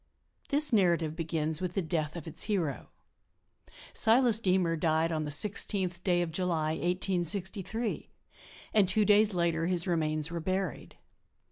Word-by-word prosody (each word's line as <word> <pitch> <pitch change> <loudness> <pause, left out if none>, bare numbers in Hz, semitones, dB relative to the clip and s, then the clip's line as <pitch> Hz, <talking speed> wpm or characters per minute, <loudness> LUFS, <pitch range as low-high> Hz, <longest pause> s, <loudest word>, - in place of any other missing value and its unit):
This 290 -2 +1
narrative 170 -6 +2
begins 160 -1 -2
with 180 -1 -3
the 195 - +1
death 155 -2 -2
of 170 - -7
its 160 - -3
hero. 175 - -2 1.0
Silas 230 -1 +5
Deemer 185 -5 +1
died 160 +1 +1
on 155 -1 -1
the - - -4
16th 185 +2 -1
day 175 -2 +1
of 165 - -5
July, 160 -3 -1
1863, 190 +6 -2 0.6
and 205 -3 +4
two 210 +3 +2
days 210 -1 +4
later 170 -1 0
his 175 -2 -1
remains 155 -3 -1
were 170 - -3
buried. 185 0 -3
175 Hz, 140 wpm, -30 LUFS, 160-195 Hz, 1.0 s, Silas